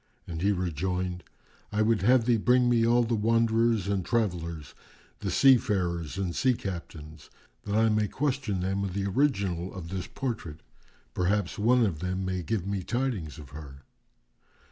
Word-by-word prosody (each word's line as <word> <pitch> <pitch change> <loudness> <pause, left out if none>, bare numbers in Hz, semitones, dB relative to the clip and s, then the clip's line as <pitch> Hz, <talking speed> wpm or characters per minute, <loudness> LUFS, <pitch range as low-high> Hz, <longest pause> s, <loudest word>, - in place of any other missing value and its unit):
and 80 -2 -6
he 100 +2 +3
rejoined, 90 0 -2 0.5
"I 105 +1 +1
would 110 -1 +2
have 120 +3 +4
thee 120 -1 +3
bring 125 +3 +3
me 115 -1 +3
all 120 +1 +4
the 115 0 -1
wanderers 115 -1 +2
and 100 -2 0
travellers, 85 - -2 0.5
the - - -3
seafarers 95 - +2
and 95 -3 -2
sea 130 -2 +2
captains, 80 -6 -8 0.4
that 100 0 -2
I 110 +1 +4
may 105 -1 +2
question 130 -7 -1
them 95 +2 -1
of 95 -2 -4
the 100 -1 -1
original 100 - 0
of 85 -3 -8
this 95 0 -4
portrait; 95 - -5 0.5
perhaps 95 +2 0
one 120 +3 +4
of 85 -7 -2
them 95 +2 -2
may 95 -1 -2
give 95 +2 -2
me 100 -1 -2
tidings 110 - -2
of 75 -3 -12
her." 70 -2 -10
100 Hz, 165 wpm, -28 LUFS, 90-115 Hz, 0.5 s, have